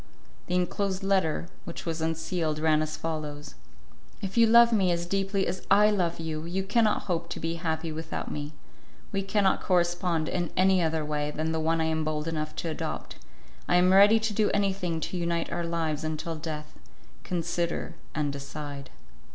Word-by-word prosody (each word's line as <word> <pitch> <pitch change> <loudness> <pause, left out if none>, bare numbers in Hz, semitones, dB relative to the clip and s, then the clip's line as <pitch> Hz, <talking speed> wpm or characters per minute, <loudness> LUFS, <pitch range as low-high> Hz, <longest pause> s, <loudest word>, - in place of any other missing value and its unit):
The 180 - 0
enclosed 190 +2 0
letter 185 -4 +1 0.2
which 170 - -7
was 165 -1 -2
unsealed, 160 0 -1
ran 155 0 +3
as 155 0 -3
follows: 150 -2 -4 0.7
"If 195 -1 -5
you 230 -1 +6
love 235 +1 +7
me 190 -4 +3
as 170 0 -1
deeply 195 +1 0
as 185 - -3
I 210 +2 +6
love 175 -5 0
you, 160 -1 -3
you 185 +3 -2
cannot 215 +2 +2
hope 170 -3 -2
to - - -5
be 165 +1 -2
happy 160 0 -2
without 160 +1 -5
me; 150 +1 -5 0.6
we 195 - 0
cannot 195 0 +2
correspond 175 -2 +1
in 175 -2 -1
any 185 0 +4
other 160 -2 0
way 150 0 -1
than 155 +2 -2
the 160 - -1
one 165 +1 +1
I 160 - +2
am 160 0 0
bold 155 0 -2
enough 155 -1 -3
to 170 - -3
adopt. - - -5 0.5
I - - +3
am 180 +1 +5
ready 205 +3 +7
to 220 -1 -1
do 210 0 +2
anything 190 -5 0
to 180 - -3
unite 170 -1 -1
our 170 0 -2
lives 160 -2 -1
until 155 +1 -3
death. 155 - -6 0.4
Consider 175 -1 -2 0.2
and 145 -2 0
decide." 140 -1 -7
170 Hz, 180 wpm, -28 LUFS, 155-190 Hz, 0.7 s, love